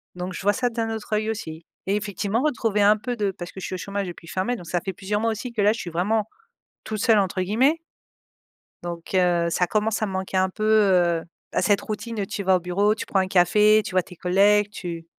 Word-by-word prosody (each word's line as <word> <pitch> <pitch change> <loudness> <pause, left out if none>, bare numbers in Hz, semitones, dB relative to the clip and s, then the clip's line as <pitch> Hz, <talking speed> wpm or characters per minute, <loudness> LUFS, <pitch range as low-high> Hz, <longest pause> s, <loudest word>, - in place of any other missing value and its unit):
donc 180 +1 -5
je - - -6
vois 205 +1 +3
ça 250 0 0
d'un 225 -1 -2
autre 220 -1 -5
œil 215 +1 0
aussi 160 -7 -6 0.2
et 200 - +2
effectivement 210 +2 -1
retrouver 225 -8 +1
un 210 +1 +5
peu 245 +3 -4
de 210 -3 0
parce 175 -1 -8
que - - -10
je - - -5
suis - - -4
au - - -4
chômage 200 +1 -4
depuis 170 -1 -10
fin 185 +3 -2
mai, 245 - 0
donc 175 - -10
ça 175 +1 -1
fait 190 - -3
plusieurs 205 +3 -2
mois 230 - +1
aussi 225 +3 -5
que 215 - -1
là, 210 +2 +4
je 230 - -7
suis 175 - -5
vraiment 205 +6 0 0.6
«toute 215 0 -4
seule» 220 0 +4
entre 190 -1 -1
guillemets 245 - +2 1.1
donc 170 0 -7
heu, 175 -2 +3
ça 180 +1 +1
commence 215 +2 0
à - - +2
me 195 - -5
manquer 190 0 -2
un 185 0 +2
peu, 215 +3 -6
heu, 185 -6 +3 0.3
bah - - 0
cette 205 +1 +2
routine, 215 0 -4
tu 200 - -5
vas 190 0 +4
au - - +2
bureau, 200 +4 +1
tu - - -5
prends 195 - +1
un 190 - +1
café, 210 +4 +4
tu - - -6
vois 185 -1 +2
tes 180 - -13
collègues, 200 +4 +3
tu 170 -5 -7
200 Hz, 255 wpm, -24 LUFS, 180-215 Hz, 1.1 s, un